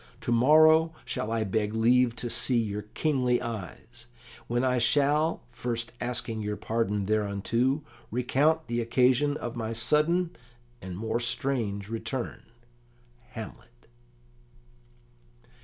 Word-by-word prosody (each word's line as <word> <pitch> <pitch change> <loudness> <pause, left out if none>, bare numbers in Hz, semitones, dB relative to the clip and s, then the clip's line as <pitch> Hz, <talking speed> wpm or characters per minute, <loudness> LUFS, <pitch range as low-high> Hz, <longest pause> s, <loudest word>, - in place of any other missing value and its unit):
To - - -3
morrow 155 +6 +5
shall 110 - -3
I 115 -1 0
beg 105 +1 -1
leave 120 +1 +3
to 120 0 -3
see 120 +1 +2
your 105 -2 -1
kingly 125 +2 0
eyes: 115 +1 -7 0.4
when 120 +1 0
I 125 -1 +2
shall, 145 +6 +2
first 120 -1 -3
asking 115 -2 -2
your 105 0 -3
pardon 105 -2 -1
thereunto, 110 +7 0 0.3
recount 145 +7 +1
the 120 0 -2
occasion 130 +5 +2
of 120 0 -5
my 115 -1 -3
sudden 160 +9 +1 0.5
and 95 -1 -7
more 110 +3 -2
strange 120 -5 -2
return. 115 +3 -4 0.9
"HAMLET." 100 - -10
120 Hz, 115 wpm, -28 LUFS, 110-130 Hz, 0.9 s, morrow